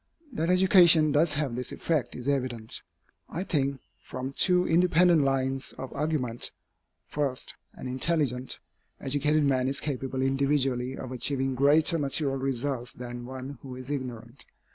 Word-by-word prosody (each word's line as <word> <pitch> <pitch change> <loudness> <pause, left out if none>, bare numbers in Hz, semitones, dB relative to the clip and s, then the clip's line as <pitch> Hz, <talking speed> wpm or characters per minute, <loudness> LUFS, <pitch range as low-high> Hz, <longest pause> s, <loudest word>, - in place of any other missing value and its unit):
That 165 -5 -1
education 180 -4 +6
does 150 +2 +3
have 145 -5 -1
this 125 +1 -3
effect 155 -5 -1
is 125 +1 -6
evident, 125 -5 -2 0.5
I 175 - -3
think, 140 -6 -1 0.2
from 130 +1 -6
two 180 +4 +3
independent 175 -1 +4
lines 135 -1 -1
of 130 - -7
argument. 140 -6 -2 0.6
First, 140 -4 -2 0.2
an - - -9
intelligent, 130 -1 -1 0.4
educated 145 +3 +1
man 130 -2 +2
is 140 +1 0
capable 135 -2 -3
individually 135 -2 0
of 130 - -7
achieving 135 +1 -1
greater 150 +5 +3
material 140 -1 +1
results 130 -1 -2
than 120 0 -7
one 130 0 -7
who 130 -2 -8
is 130 +2 -7
ignorant. 125 -3 -6
135 Hz, 140 wpm, -28 LUFS, 130-150 Hz, 0.6 s, education